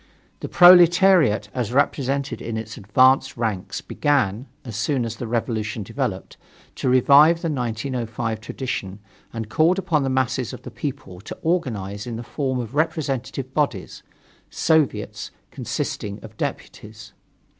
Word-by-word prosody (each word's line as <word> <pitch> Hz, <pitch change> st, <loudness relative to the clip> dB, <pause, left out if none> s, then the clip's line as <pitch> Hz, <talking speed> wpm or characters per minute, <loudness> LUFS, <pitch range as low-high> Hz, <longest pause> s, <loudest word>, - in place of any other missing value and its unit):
The -, -, -6 dB
proletariat, 175 Hz, -, +6 dB
as 120 Hz, -3 st, -2 dB
represented 140 Hz, +1 st, 0 dB
in 115 Hz, -1 st, -4 dB
its 110 Hz, +1 st, -6 dB
advanced 130 Hz, +6 st, +3 dB
ranks, 110 Hz, -6 st, -3 dB
began, 130 Hz, -4 st, 0 dB, 0.2 s
as 115 Hz, -4 st, -7 dB
soon 125 Hz, +2 st, 0 dB
as 115 Hz, -1 st, -5 dB
the 120 Hz, -, -5 dB
revolution 110 Hz, -2 st, -2 dB
developed, 115 Hz, -2 st, -4 dB, 0.4 s
to -, -, -1 dB
revive 145 Hz, +6 st, +5 dB
the 165 Hz, -, 0 dB
1905 115 Hz, -3 st, -3 dB
tradition 110 Hz, -5 st, -5 dB, 0.3 s
and 115 Hz, -2 st, -5 dB
called 165 Hz, -, +2 dB
upon 165 Hz, -5 st, 0 dB
the 135 Hz, -, -1 dB
masses 130 Hz, -1 st, -1 dB
of -, -, -10 dB
the -, -, -9 dB
people 130 Hz, -11 st, -6 dB
to -, -, -9 dB
organize 110 Hz, -, -2 dB
in 120 Hz, -, -4 dB
the 115 Hz, -, -6 dB
form 130 Hz, 0 st, -3 dB
of 120 Hz, -1 st, -5 dB
representative 135 Hz, -4 st, -2 dB
bodies 140 Hz, -11 st, -2 dB, 0.5 s
soviets, 160 Hz, -4 st, 0 dB, 0.2 s
consisting 100 Hz, -1 st, -4 dB
of 110 Hz, -1 st, -12 dB
deputies. 105 Hz, -1 st, -7 dB
125 Hz, 135 wpm, -22 LUFS, 110-145 Hz, 0.5 s, proletariat